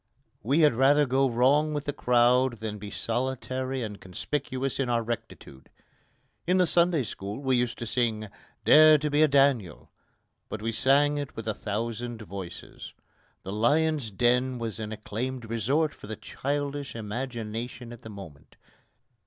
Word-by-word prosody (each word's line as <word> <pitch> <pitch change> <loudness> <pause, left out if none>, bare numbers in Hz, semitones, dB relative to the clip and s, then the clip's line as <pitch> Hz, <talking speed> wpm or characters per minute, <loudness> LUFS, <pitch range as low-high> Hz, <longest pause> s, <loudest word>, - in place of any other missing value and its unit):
We 140 +8 +2
had 150 -3 +5
rather 140 +4 +4
go 135 +1 +2
wrong 140 +6 +3
with 145 -1 -3
the 145 - -2
crowd 125 0 +3
than 110 -2 -6
be 105 0 -7
solitary 130 +2 -3
and 105 -2 -7
conspicuous 130 +8 -3
in 130 -2 0
our 120 -1 +1
rectitude. 110 - -7 0.8
In 180 +1 +3
the 180 - +4
Sunday 170 -3 +3
school 100 0 -6
we 130 -2 +1
used 120 -1 0
to 120 - -5
sing 110 -2 -1 0.4
"Dare 155 0 +8
to 150 0 -2
be 145 +1 +3
a 155 - +7
Daniel," 135 - +1 0.6
but 110 - -5
we 115 +2 -2
sang 145 +5 +3
it 145 -1 -6
with 115 -1 -7
a 110 - 0
thousand 115 +2 -4
voices. 95 -3 -9 0.5
The 95 - -5
lion's 145 +4 +2
den 125 +5 +1
was 115 -3 -4
an 110 -1 -5
acclaimed 115 +3 -5
resort 130 +8 0
for - - -12
the 110 - -5
childish 140 +3 -4
imagination 115 +1 -5
at 120 - -12
the 110 - -10
moment. 95 -9 -12
125 Hz, 160 wpm, -27 LUFS, 110-140 Hz, 0.8 s, Dare